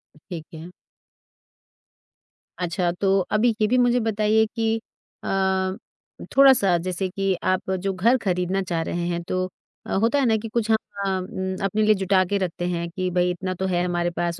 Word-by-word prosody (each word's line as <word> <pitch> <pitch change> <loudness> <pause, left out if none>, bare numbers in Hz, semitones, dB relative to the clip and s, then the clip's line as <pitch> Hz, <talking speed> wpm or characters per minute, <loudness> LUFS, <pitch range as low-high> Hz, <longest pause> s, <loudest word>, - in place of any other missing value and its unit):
अ, - - -19
ठीक 165 -3 -6
है। 165 +3 -9 1.9
अच्छा, 175 0 0
तो 195 +2 +1
अभी 220 +1 +3
ये 215 - +4
भी 250 +3 +2
मुझे 245 0 +3
बताइए 220 0 +2
कि 225 -1 +1 0.5
अ, 190 0 0 0.6
थोड़ा-सा 255 -10 +6
जैसे 185 +2 -2
कि 195 0 0
आप 185 0 0
जो 190 +1 -1
घर 230 +8 +3
ख़रीदना 185 0 0
चाह 170 -3 -2
रहे 170 +1 -3
हैं 170 0 -2
तो 185 +1 -1 0.4
अ, - - -4
होता 235 +5 +3
है 270 - +2
ना, 220 -1 +3
कि 225 +1 -6
कुछ 225 -1 -1
ह - - +6 0.3
अ, - - 0
हम 190 0 -3
अपने 205 +2 0
लिए 215 0 +5
जुटा 190 0 +2
के 200 +3 0
रखते 175 -2 -3
हैं 170 -1 -2
कि 185 +1 -3
भई 180 0 +2
इतना 185 +1 -3
तो 190 - 0
है 175 -1 +1
हमारे 175 -1 0
पास 170 -1 -1
190 Hz, 190 wpm, -23 LUFS, 180-215 Hz, 1.9 s, थोड़ा-सा